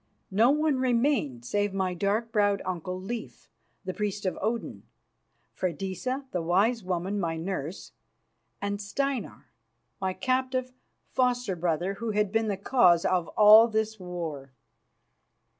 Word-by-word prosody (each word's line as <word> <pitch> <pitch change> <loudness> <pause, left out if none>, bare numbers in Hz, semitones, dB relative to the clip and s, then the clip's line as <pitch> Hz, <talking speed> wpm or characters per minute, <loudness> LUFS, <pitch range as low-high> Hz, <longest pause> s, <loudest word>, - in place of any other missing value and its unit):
No 220 +6 +4
one 300 -1 +2
remained 235 - +1
save 205 +6 -1
my 190 -2 0
dark 205 +5 -1
browed 205 -2 +2
uncle, 185 0 -4
Leif, 220 +4 -7 0.4
the 185 - -3
priest 205 0 -3
of 185 - 0
Odin, 225 +4 -2 0.7
Freydisa, 190 - -3
the 180 - -1
wise 200 +7 +2
woman, 185 +2 -2
my 165 -3 -1
nurse, 170 -1 -5 0.7
and 200 0 -3
Steinar, 245 - -3 0.5
my 190 -1 0
captive 255 +1 -1 0.4
foster 245 -5 +1
brother, 175 +2 -1
who 230 - -2
had 210 -2 +1
been 225 0 +1
the 200 -2 -1
cause 185 -5 +4
of 180 -3 +1
all 215 +2 +9
this 220 -1 -1
war. 165 -7 -6
200 Hz, 130 wpm, -28 LUFS, 180-230 Hz, 0.7 s, all